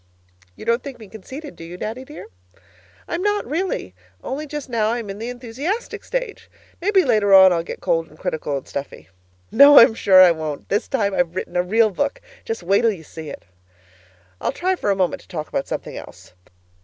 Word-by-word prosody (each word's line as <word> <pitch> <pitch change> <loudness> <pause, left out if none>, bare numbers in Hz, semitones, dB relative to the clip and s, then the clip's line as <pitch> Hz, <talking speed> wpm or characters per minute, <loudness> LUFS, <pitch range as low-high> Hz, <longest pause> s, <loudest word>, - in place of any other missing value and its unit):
You - - -11
don't 235 +2 +1
think 275 -3 -8
me 220 -3 -12
conceited, 265 - -10
do - - -11
you, 170 +2 -9
Daddy 225 +7 -5
dear? 295 +3 -10 0.8
I'm 340 - -3
not, 415 +1 0
really, 330 - -3 0.3
only 295 +3 -4
just 295 -1 -6
now 225 -4 0
I'm 230 -4 -3
in 195 - -9
the 230 +2 -4
enthusiastic 255 - -4
stage. - - -5 0.3
Maybe 390 0 +3
later 210 -5 +4
on 190 -1 +8
I'll 170 - 0
get 165 - -8
cold 165 0 0
and 155 - -18
critical 150 -3 -3
and 135 - -9
sniffy. 140 -8 -7 0.4
No, 285 0 +8
I'm 230 0 +9
sure 195 -4 +5
I 185 -2 +9
won't! 155 -3 -5
This 205 +3 0
time 205 -7 0
I've 175 -2 0
written 185 - -5
a 180 - +3
real 215 +4 +2
book. 285 +8 -2 0.3
Just 225 -5 -4
wait 195 +3 +3
till 230 -1 +3
you 180 -6 -8
see 160 0 -9
it. 85 - -10 1.0
I'll - - 0
try 370 +2 -1
for 210 - -2
a 200 - +3
minute 185 -2 0
to - - -20
talk 155 -4 -5
about 135 - -3
something - - -5
else. - - -12
220 Hz, 205 wpm, -21 LUFS, 180-280 Hz, 1.0 s, I'm